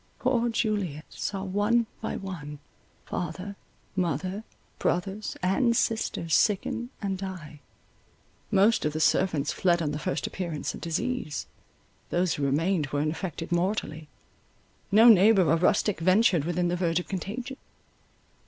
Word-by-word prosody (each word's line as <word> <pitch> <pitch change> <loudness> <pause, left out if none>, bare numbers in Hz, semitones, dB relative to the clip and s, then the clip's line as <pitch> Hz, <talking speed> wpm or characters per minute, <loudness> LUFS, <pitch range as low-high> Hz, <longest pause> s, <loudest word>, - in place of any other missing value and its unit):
Poor 240 -2 +1
Juliet 205 -10 -1
saw 195 -2 -4
one 205 +5 +2 0.2
by - - -3
one, 165 -7 -6 0.5
father, 180 +4 -4 0.4
mother, 185 +3 -1 0.4
brothers, 195 +4 -1
and 235 +6 +2
sisters, 170 -7 -1
sicken 220 +6 +1
and 195 -2 -2
die. 180 -6 -7 0.9
Most 210 +3 +4
of 150 - 0
the 155 - -2
servants 160 -3 +2
fled 175 -2 +2
on 155 -3 -1
the 150 - -3
first 185 - -2
appearance 170 -5 -4
of - - -9
disease, 165 - -2 0.6
those 175 -1 +1
who 145 - -3
remained 155 +3 +1
were 145 +1 -2
infected 165 +2 -3
mortally; 175 -4 -1 0.8
no 220 +4 +7
neighbour 205 -3 +7
or 160 - +4
rustic 190 +3 +2
ventured 185 -2 +3
within 175 +1 0
the 175 - 0
verge 170 -1 +1
of 180 - -7
contagion. 230 +8 -5
185 Hz, 135 wpm, -27 LUFS, 165-205 Hz, 0.9 s, no